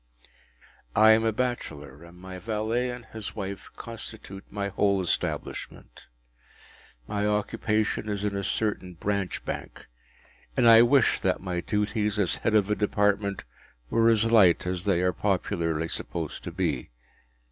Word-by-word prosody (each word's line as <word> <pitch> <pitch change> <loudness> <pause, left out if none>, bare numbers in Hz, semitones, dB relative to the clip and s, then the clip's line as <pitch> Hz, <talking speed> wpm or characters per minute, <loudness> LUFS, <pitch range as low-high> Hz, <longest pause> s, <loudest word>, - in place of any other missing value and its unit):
I 110 +1 +7
am 110 +1 +5
a 110 - +2
bachelor, 85 - -4
and 85 +1 -14
my 95 +1 -9
valet 110 +4 -1
and 120 -1 -7
his 110 -2 -8
wife 100 -1 -6
constitute 110 -4 -9
my 100 -1 -3
whole 100 0 +2
establishment. 90 -3 -4 1.0
My 105 0 -1
occupation 105 0 0
is 100 -1 -2
in 105 -1 -1
a 100 - -2
certain 95 -4 -2
Branch 100 +1 -2
Bank, - - -6 0.7
and 120 - +5
I 115 0 +9
wish 130 +3 +4
that 95 -1 0
my 90 -2 -3
duties 105 0 -1
as 100 -4 +1
head 110 - 0
of 105 -1 +3
a - - +3
Department 100 -1 0 0.5
were 115 0 +4
as 110 -1 +3
light 95 -8 +5
as 90 +1 -3
they 95 -4 +2
are 90 0 +2
popularly 85 -4 -1
supposed 80 -1 -5
to - - -4
be. - - -2
105 Hz, 145 wpm, -27 LUFS, 95-110 Hz, 1.0 s, I